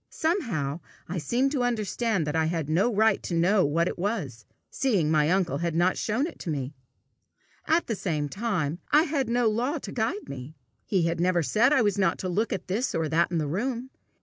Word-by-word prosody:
Somehow 195 - -1 0.3
I 175 +2 -3
seemed 245 - +1
to 280 -4 0
understand 225 -5 0
that 150 +1 -2
I 160 0 +2
had 160 -2 -2
no 190 +9 +3
right 220 -1 +3
to 175 - -3
know 185 +4 +3
what 165 +4 +1
it - - -4
was, 170 - -3 0.3
seeing 195 - +1
my 155 -1 +3
uncle 175 -6 +1
had 170 -1 -1
not 175 +2 +3
shown 230 +7 0
it 330 - -8
me! 140 -3 -3 0.9
At 330 +2 +3
the 225 - -2
same 165 -7 -2
time 175 -4 -2
I 300 +2 +6
had 290 -6 -1
no 240 0 +2
law 245 +8 0
to - - -7
guide 220 -3 -2
me. 140 +2 -8 0.3
He 190 -4 +1
had 165 0 0
never 175 -1 +2
said 230 - +3
I 265 -5 +4
was 205 -2 +1
not 190 - +2
to 185 - -4
look 210 +5 0
at 190 -3 -3
this 220 +8 -1
or 160 -2 0
that 165 +3 +2
in 175 - -1
the 155 - 0
room. 240 - -3
185 Hz, 210 wpm, -27 LUFS, 160-235 Hz, 0.9 s, I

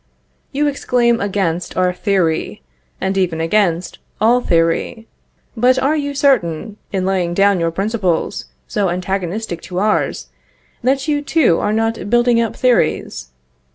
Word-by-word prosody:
You 290 +2 0
exclaim 245 -4 +1
against 185 -4 -2
our 180 0 +2
theory, 180 - -1 0.4
and 190 0 -1
even 175 -4 0
against 175 0 0 0.2
all 240 +3 +4
theory. 165 +5 0 0.5
But 250 +3 +3
are 270 +4 +1
you 285 -2 -3
certain, 215 - +1
in 190 -2 -1
laying 180 -3 0
down 200 -1 +3
your 165 0 +1
principles, 190 - -1 0.2
so 200 -3 0
antagonistic 185 +1 -3
to 180 - -5
ours, 210 +3 0 0.5
that 265 +3 0
you 295 -1 +1
too 290 - +2
are 205 - 0
not 225 -1 -1
building 240 0 +3
up 230 - -2
theories? 250 - 0
205 Hz, 135 wpm, -18 LUFS, 180-240 Hz, 0.5 s, all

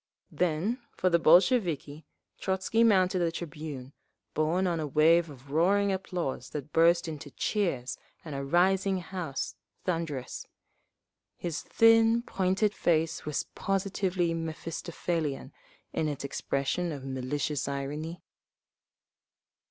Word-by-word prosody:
Then 180 - 0 0.2
for 185 - +2
the 170 - +4
Bolsheviki, 165 - +3 0.3
Trotzky 190 +4 +1
mounted 190 -4 +4
the 170 -1 +1
tribune, 150 -5 -7 0.4
borne 165 +5 +1
on 170 -3 0
a 155 - -2
wave 160 +3 +4
of 135 -1 -13
roaring 195 +6 +3
applause 180 -9 -3
that 150 0 -6
burst 170 +2 +4
into 150 -3 -6
cheers 145 - -1 0.3
and 155 - -6
a 140 0 -3
rising 190 +6 +3
house, 175 -5 -4 0.3
thunderous. 165 -8 -3 0.9
His 170 -3 -3
thin, 225 +1 +5
pointed 195 0 +1
face 160 -3 +1
was 150 -1 -1
positively 190 -3 0
Mephistophelian 165 -1 -3 0.4
in 155 - 0
its 145 -2 -4
expression 140 +5 -1
of 140 -3 -6
malicious 135 +2 -2
irony. 145 +5 -4
165 Hz, 115 wpm, -29 LUFS, 150-185 Hz, 0.9 s, thin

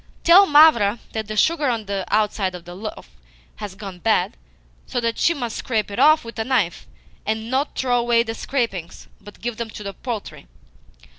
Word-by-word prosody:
Tell 375 +4 +7
Mavra 290 - +6
that 220 -1 -4
the 215 0 -5
sugar 310 +3 +2
on 230 -3 -2
the 200 -1 -3
outside 210 -3 0
of 175 -1 -10
the 175 - -9
loaf 210 +4 -8 0.5
has 205 -2 -7
gone 195 -3 -9
bad, 215 -3 +1 0.5
so 245 - -2
that 230 -1 -2
she 335 - +3
must 240 -6 -4
scrape 215 -4 -2
it 200 - -4
off 310 -3 +5
with 230 0 -8
a - - +1
knife, 220 -9 -1 0.4
and 220 +2 -3
NOT 270 +3 -1
throw 245 -2 +1
away 235 -1 +3
the 225 -1 -5
scrapings, 225 -10 -3 0.2
but 205 - -14
give 235 -1 -4
them 235 -1 -4
to 210 - -9
the 200 -1 -5
poultry. 220 - -6
225 Hz, 195 wpm, -22 LUFS, 205-245 Hz, 0.5 s, Tell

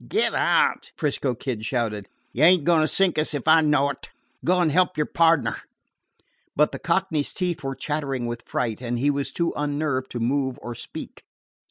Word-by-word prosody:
"Get 440 - +1
out!" 470 -1 +1
'Frisco 140 -4 -1
Kid 115 -2 -4
shouted. 110 -5 -2 0.3
"You 135 - 0
ain't 175 -1 +6
a - - -10
going 170 -2 +4
to 155 - +2
sink 185 -1 +2
us 155 0 -1
if 145 +1 -5
I 160 +1 +7
know 145 -2 +2
it. 135 - -11 0.3
Go 180 +2 +2
and 170 -3 +2
help 180 +3 +2
your 150 - +1
pardner." 165 -2 +2 1.0
But 150 +1 +3
the - - -6
Cockney's 170 -4 0
teeth 175 -5 -2
were 135 0 -3
chattering 140 -5 -3
with 120 0 -4
fright, 115 -2 -2
and 120 -1 -2
he 140 +4 +2
was 140 -1 -2
too 170 -1 -1
unnerved 145 -3 -2
to 120 - -3
move 130 +2 0
or 120 - -5
speak. - - -9
145 Hz, 195 wpm, -24 LUFS, 130-165 Hz, 1.0 s, I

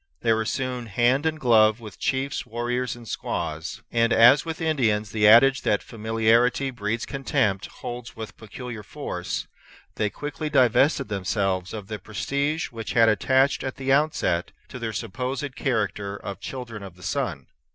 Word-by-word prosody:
They 115 - +3
were 110 0 0
soon 125 0 -3
hand 120 +8 +2
and 155 -1 -2
glove 110 -3 +4
with 110 -4 -11
chiefs, 135 +1 -1
warriors, 120 +2 -2
and 120 -1 -12
squaws; 80 -4 -4
and 115 0 +2
as 120 +5 +7
with 165 -1 -4
Indians 115 -10 +1
the 105 -2 +3
adage 130 +5 +7
that 105 - +1
familiarity 115 +4 +2
breeds 115 -1 -2
contempt 110 -8 0
holds 120 0 -8
with 110 -1 -7
peculiar 115 +1 -8
force, 105 - -5 0.5
they 105 - +1
quickly 150 +5 -5
divested 135 -1 +3
themselves 95 -2 -1
of 105 -3 -6
the 105 +1 -6
prestige 140 - -2
which 115 -2 -5
had 115 -3 +6
attached 130 +6 +2
at 130 - -4
the 135 0 0
outset 140 - +1 0.2
to 125 - -8
their 115 -2 -3
supposed 130 +6 -4
character 105 -6 -1
of 100 -1 -7
children 120 -4 -7
of 95 -3 -9
the 90 - -16
Sun. - - -2
115 Hz, 160 wpm, -25 LUFS, 105-130 Hz, 0.5 s, as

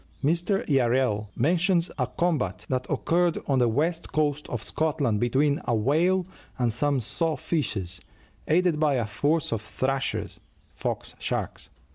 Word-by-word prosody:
Mr. 175 +6 +1
Yarrel 125 -6 +2
mentions 175 - +2
a 125 - +1
combat 130 - -1
that 130 -1 -1
occurred 175 0 +1
on 135 -2 +2
the 120 - +4
west 160 +8 0
coast 150 -1 0
of 115 -3 -3
Scotland 140 -9 0
between 140 +5 +2
a 120 - +1
whale 165 - +2 0.3
and 120 -3 +1
some 140 +3 +1
saw 160 +7 -1
fishes, 95 - -2 0.5
aided 170 -1 +3
by 150 -3 +3
a 120 -3 0
force 145 +9 0
of 110 - -2
"thrashers" 135 +4 -2 0.3
(fox - - -4
sharks). - - -3
140 Hz, 140 wpm, -26 LUFS, 120-165 Hz, 0.5 s, the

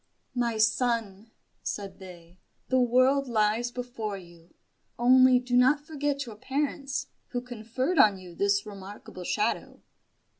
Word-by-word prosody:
"My 240 -3 0
son," 220 -2 0 0.3
said 200 -1 -5
they, 180 -1 -13 0.3
"the 260 - +3
world 255 +3 +3
lies 225 +1 +1
before 240 -4 -5
you. 170 -2 -16 0.4
Only 255 +1 +6
do 245 0 -1
not 270 +4 +4
forget 290 -3 -2
your 225 -3 -10
parents, 275 +1 -2 0.2
who 245 - -3
conferred 250 +6 -2
on 205 -6 +6
you 180 -2 -11
this 200 +3 +1
remarkable 195 -2 -9
shadow." 210 +5 -2
235 Hz, 125 wpm, -28 LUFS, 200-255 Hz, 0.4 s, Only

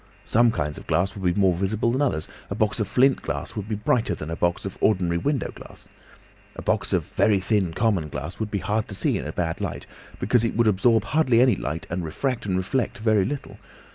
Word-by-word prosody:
Some 120 +1 +4
kinds 75 -9 -2
of - - -15
glass 90 +5 +1
would 95 -3 0
be 100 - -2
more 95 -2 +4
visible 100 +6 0
than 130 +4 0
others, 100 - 0 0.2
a 100 - -3
box 110 +1 0
of 105 - 0
flint 130 +5 +3
glass 70 +4 -4
would 105 -1 -5
be 110 - 0
brighter 110 +3 +1
than 75 +2 -6
a - - -2
box 85 +2 0
of 95 - -5
ordinary 90 -5 +2
window 140 - -1
glass. - - -14 0.7
A - - -7
box - - 0
of - - +1
very 105 -2 +2
thin 95 -2 +1
common 100 -9 +1
glass 75 +5 -6
would 110 -1 -2
be 105 - -1
hard 105 +3 -1
to 100 - -7
see 95 - +1
in - - -5
a - - -3
bad 85 -2 -2
light, - - -4 0.3
because 115 +4 +2
it 115 - -1
would 115 +1 +3
absorb 110 +2 +3
hardly 125 -1 +2
any 125 -3 +5
light 80 -2 -4
and 90 +1 -2
refract 120 - -2
and 95 -2 +1
reflect 95 +7 -1
very 110 -3 +2
little. 145 +6 -5
105 Hz, 230 wpm, -24 LUFS, 90-115 Hz, 0.7 s, any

